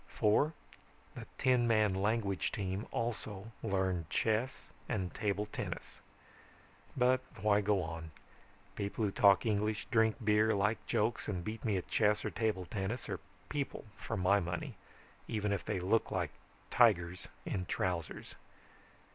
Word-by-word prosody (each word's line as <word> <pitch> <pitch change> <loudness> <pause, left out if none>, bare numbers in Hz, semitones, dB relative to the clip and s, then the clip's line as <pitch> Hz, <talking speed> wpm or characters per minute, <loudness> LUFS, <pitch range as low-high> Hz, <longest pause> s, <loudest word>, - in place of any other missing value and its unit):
"Four, 145 +9 +2 0.6
the - - -8
ten 125 -2 +3
man 110 -3 +4
language 100 0 0
team 95 +1 -3
also 110 -2 -3
learned 95 -6 0
chess 115 +4 0 0.2
and 95 -6 -1
table 105 -1 -1
tennis. 105 - -6 1.0
"But 130 0 +4 0.2
why 105 0 +4
go 100 -2 +2
on? 80 0 -6 0.7
People 100 +2 -1
who 100 - 0
talk 100 0 +5
English, 105 0 0
drink 110 -1 +4
beer, 105 +1 +4
like 105 +2 +1
jokes 110 +2 0
and 90 -4 -2
beat 110 +4 -5
me 105 -4 +1
at 90 - -4
chess 105 -1 +2
or - - -1
table 110 -5 -1
tennis 100 +6 -3
are - - -3 0.3
people 140 -5 -3
for 115 - -4
my 95 +2 +4
money, 90 -1 -3 0.5
even 105 -2 -1
if 100 - -1
they - - -2
look 100 +5 +2
like - - -1 0.4
tigers 90 -7 +3 0.2
in 90 -2 -2
trousers. 90 -3 -2
105 Hz, 140 wpm, -34 LUFS, 95-110 Hz, 1.0 s, talk